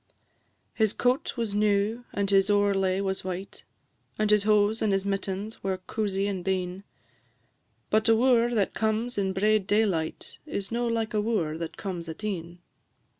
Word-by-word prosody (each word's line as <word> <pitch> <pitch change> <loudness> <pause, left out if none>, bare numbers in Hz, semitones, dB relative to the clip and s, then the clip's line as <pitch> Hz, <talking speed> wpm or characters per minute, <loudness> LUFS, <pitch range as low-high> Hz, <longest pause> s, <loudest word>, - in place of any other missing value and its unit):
His 220 -2 +1
coat 250 +1 0
was 230 -4 -2
new, 210 +3 +1
and 200 -1 -1
his 195 0 +3
owrelay 195 -2 +2
was 190 -1 -2
white, 185 +1 -6 0.5
And 215 0 +2
his 210 -1 +4
hose 210 +1 +3
and 215 - +2
his 195 0 0
mittens 195 +2 -3
were 190 -1 -1
coozy 195 +1 -2
and 190 -3 -3
bein; 185 0 -2 1.1
But 220 +1 +3
a 225 - +6
wooer 240 0 +3
that 200 -3 +1
comes 220 +1 -1
in 190 -1 0
braid 205 +1 +2
daylight 195 -7 0
Is 200 -8 -4
no 240 +1 0
like 230 0 -1
a 210 - +2
wooer 205 -9 0
that 165 -1 -5
comes 175 -4 -5
at 160 +6 -8
e'en. 175 -4 -4
205 Hz, 165 wpm, -27 LUFS, 190-220 Hz, 1.1 s, a